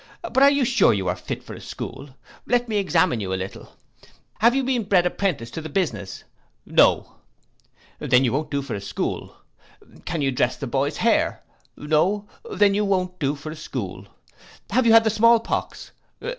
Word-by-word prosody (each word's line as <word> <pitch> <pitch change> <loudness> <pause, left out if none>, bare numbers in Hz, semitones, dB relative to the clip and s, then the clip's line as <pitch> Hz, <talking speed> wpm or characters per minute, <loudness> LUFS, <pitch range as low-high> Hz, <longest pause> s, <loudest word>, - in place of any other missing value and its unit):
But 265 -6 0
are 280 - +8
you 280 -2 +2
sure 255 - +4
you 95 -2 -2
are 90 - 0
fit - - -6
for - - -10
a - - -10
school? 145 - -8 0.4
Let 245 0 +1
me 215 -2 -1
examine 170 - +2
you 95 -3 -4
a - - 0
little. 95 +1 -7 0.6
Have 235 +5 +4
you 270 - +1
been 250 -4 0
bred 185 -3 +3
apprentice 175 -11 -2
to 160 - -5
the 155 - -7
business? 115 - -3 0.4
No. - - +2 0.8
Then 125 +1 +3
you 120 - 0
won't 150 +2 -2
do 140 -1 -2
for 135 - -6
a 100 - -4
school. 100 - -4 0.7
Can 160 -4 -2
you 135 - +1
dress 125 -1 0
the 140 - -5
boys 140 +3 -1
hair? 230 0 +1 0.3
No. 180 +8 0 0.2
Then 200 +1 +3
you 210 +1 +1
won't 185 -2 -1
do 140 0 0
for 150 +2 -8
a - - -7
school. 100 - -6 0.6
Have 240 +3 +2
you - - +6
had 225 0 +7
the 220 - +1
small 230 +2 +5
pox? 230 - -4
165 Hz, 190 wpm, -23 LUFS, 135-220 Hz, 0.8 s, are